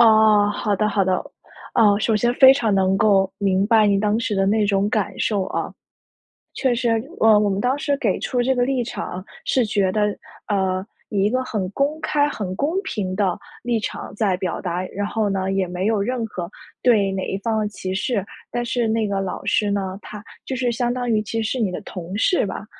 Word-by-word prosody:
哦， 215 -2 +6
好 205 0 0
的 215 +1 +1
好 200 -1 +1
的。 185 0 +2 0.6
啊， 210 -4 +5
首 220 0 +1
先 240 +3 +2
非 265 0 +8
常 225 -7 +1
能 190 0 +2
够 195 -3 +3
明 195 -1 +2
白 220 -1 +5
你 200 -1 +3
当 210 +1 +1
时 225 -3 -1
的 195 0 +1
那 210 +1 +2
种 200 0 +1
感 210 -3 -1
受 200 -3 0
啊。 - - -3 0.8
确 260 -3 +1
实， 240 0 0 0.3
呃， 220 -1 +6
我 210 -1 +2
们 195 0 -1
当 255 +4 +1
时 285 0 0
给 210 -8 0
出 245 -1 -1
这 265 +2 +2
个 245 - +3
立 260 -1 0
场 185 -5 -5 0.2
是 255 -3 +2
觉 200 -3 +1
得， 210 -1 0 0.3
呃， 190 -2 0 0.3
以 200 -2 0
一 210 - +2
个 255 +1 0
很 200 -7 -3
公 285 +7 -1
开、 290 -2 +1
很 195 -9 -4
公 290 +3 0
平 205 - -3
的 190 -3 0 0.2
立 240 -1 0
场 210 - -5
在 200 -4 +1
表 185 -2 -3
达， 180 0 -2
然 205 +2 -4
后 215 -1 -1
呢， 190 0 -1
也 190 -2 0
没 180 +2 -2
有 220 -2 +2
任 240 0 -2
何 175 -5 -6 0.3
对 205 -6 +3
哪 190 -1 -2
一 195 - -2
方 220 +1 -1
的 210 - -1
歧 185 -2 -5
视。 200 0 -1 0.3
但 240 0 -2
是 240 -2 0
那 220 -1 +1
个 200 -1 -1
老 190 0 -4
师 205 +1 +1
呢， 190 -2 -2
他 210 0 -9 0.2
就 260 - -4
是 245 -1 0
相 240 +1 0
当 245 -1 -3
于 215 -2 +2
其 225 +2 -3
实 220 - -1
是 255 - -2
你 200 -4 +1
的 - - -5
同 180 +1 -7
事 360 - +2
吧， 195 +2 -6
210 Hz, 240 characters per minute, -22 LUFS, 195-235 Hz, 0.8 s, 非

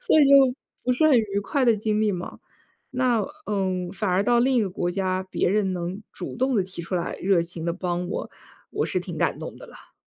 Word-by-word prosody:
所 485 - +4
以 - - +7
就， 270 -2 +6 0.3
不 250 - +1
是 310 +5 +3
很 295 -4 +6
愉 205 -3 +1
快 265 +6 0
的 235 -2 +4
经 215 0 0
历 215 -1 +2
嘛。 180 -2 -6 0.5
那 250 -4 +1 0.2
嗯， 185 -3 -1
反 205 -1 -2
而 185 +2 +2
到 240 +1 +4
另 260 +1 +3
一 235 - +4
个 195 - -2
国 175 -1 -2
家， 185 0 -1
别 - - +1
人 195 0 +1
能 180 +3 -4
主 - - -6
动 260 0 +1
地 195 - +2
提 185 -2 -8
出 180 +2 -2
来， 170 - -2
热 185 -2 +2
情 170 -1 -7
地 170 - 0
帮 180 0 -2
我， - - -4 0.4
我 - - -1
是 - - -1
挺 - - -7
感 - - 0
动 - - -7
的 - - -11
啦。 475 - -16
200 Hz, 255 characters per minute, -25 LUFS, 180-245 Hz, 0.5 s, 以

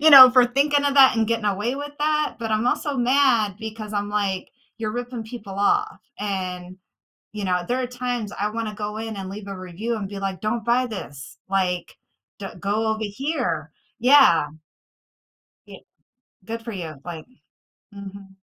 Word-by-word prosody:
you 315 - +6
know, 260 -3 +12
for 250 -1 +6
thinking 285 +3 +2
of 285 -1 +1
that, 265 -2 +7
and 220 -1 +2
getting 230 -1 -1
away 205 +5 0
with 290 0 -6
that." 300 0 +1
but 225 -2 -4
I'm 215 +2 +1
also 280 +2 0
mad, 245 -5 +3
because 220 -1 -7
I'm 205 -1 -1
like, 195 -3 -1 0.3
"You're 215 -1 -2
ripping 245 -1 -5
people 220 -4 -8
off." 415 - +1 0.2
and, 185 -3 -4 0.6
you 210 -1 -5
know, 180 -1 0
there 250 +4 0
are - - -1
times 245 -3 -3
I 210 +1 0
wanna 220 -1 -4
go 210 0 -4
in 220 -1 -5
and 190 -1 -5
leave 200 0 -8
a 195 -1 -6
review 185 +6 -4
and 205 -2 -4
be 200 0 -7
like, 195 -1 -3
"Don't 220 +1 -1
buy 245 +2 +3
this." 145 - -8
like, 185 -2 -1 0.4
"Do 195 - -5
go 210 +3 0
over 220 0 -1
here." 205 - -2 0.3
Yeah. 245 - +6 1.2
Ye - - -13 0.6
good 230 0 -5
for 230 - -6
you, 160 -7 -6
like 170 -3 -7 0.7
Mhm. 195 -1 -10
215 Hz, 175 wpm, -23 LUFS, 195-245 Hz, 1.2 s, know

